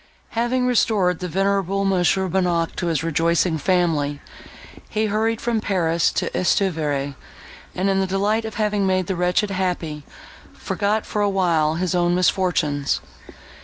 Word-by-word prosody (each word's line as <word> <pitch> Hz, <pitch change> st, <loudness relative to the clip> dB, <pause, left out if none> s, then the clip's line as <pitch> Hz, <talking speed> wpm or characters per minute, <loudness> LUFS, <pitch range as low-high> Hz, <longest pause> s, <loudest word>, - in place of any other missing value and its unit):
Having 240 Hz, +2 st, 0 dB
restored 210 Hz, -8 st, +2 dB
the 180 Hz, -, -4 dB
venerable 195 Hz, +2 st, 0 dB
Mons. 185 Hz, -2 st, +2 dB
Bonnac 180 Hz, -3 st, 0 dB
to 175 Hz, -, -2 dB
his 160 Hz, -1 st, 0 dB
rejoicing 165 Hz, +1 st, +1 dB
family, 155 Hz, -4 st, +1 dB, 0.7 s
he 215 Hz, 0 st, 0 dB
hurried 220 Hz, +2 st, 0 dB
from 230 Hz, -2 st, -1 dB
Paris 170 Hz, -5 st, +1 dB
to -, -, -1 dB
Estuvière; 155 Hz, -7 st, 0 dB, 0.6 s
and, 185 Hz, +2 st, 0 dB
in 195 Hz, 0 st, +2 dB
the 190 Hz, -, 0 dB
delight 205 Hz, +4 st, 0 dB
of 220 Hz, -1 st, -6 dB
having 210 Hz, -2 st, 0 dB
made 185 Hz, -1 st, +1 dB
the 190 Hz, -, -2 dB
wretched 180 Hz, +4 st, +1 dB
happy, 180 Hz, -5 st, -2 dB, 0.5 s
forgot, 210 Hz, +2 st, -1 dB
for 210 Hz, -, -2 dB
a 205 Hz, -, +2 dB
while, 165 Hz, -5 st, +1 dB
his 180 Hz, +1 st, -1 dB
own 175 Hz, 0 st, +2 dB
misfortunes. 175 Hz, -6 st, +1 dB
185 Hz, 145 wpm, -22 LUFS, 165-200 Hz, 0.7 s, restored